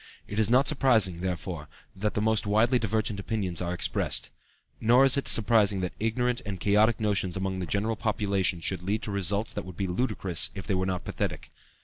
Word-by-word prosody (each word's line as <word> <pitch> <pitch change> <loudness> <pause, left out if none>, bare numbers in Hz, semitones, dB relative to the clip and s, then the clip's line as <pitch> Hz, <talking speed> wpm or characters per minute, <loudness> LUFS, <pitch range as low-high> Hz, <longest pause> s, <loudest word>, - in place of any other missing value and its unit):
It 105 - -3
is 110 -1 +2
not 130 +4 +4
surprising, 115 - +3
therefore, 90 -4 -4 0.3
that 105 +2 -2
the 105 - 0
most 110 -1 +1
widely 115 +5 +3
divergent 110 -2 -1
opinions 100 -4 -3
are 90 -1 -2
expressed. 90 - -1 0.5
Nor 120 +4 +5
is 135 - +5
it 140 - -1
surprising 105 -3 +3
that 90 - -3
ignorant 120 +3 0
and 100 -3 -5
chaotic 105 +4 +3
notions 100 -4 0
among 95 0 -2
the 90 - -4
general 110 +3 -1
population 100 -5 0
should 90 +1 -2
lead 100 +4 -2
to 105 - -4
results 100 +2 0
that 105 - -4
would 95 -2 -10
be 100 - -1
ludicrous 95 -3 0
if 95 - -6
they 100 - -1
were 95 0 0
not 90 -2 -3
pathetic. - - -4
100 Hz, 200 wpm, -27 LUFS, 95-110 Hz, 0.5 s, Nor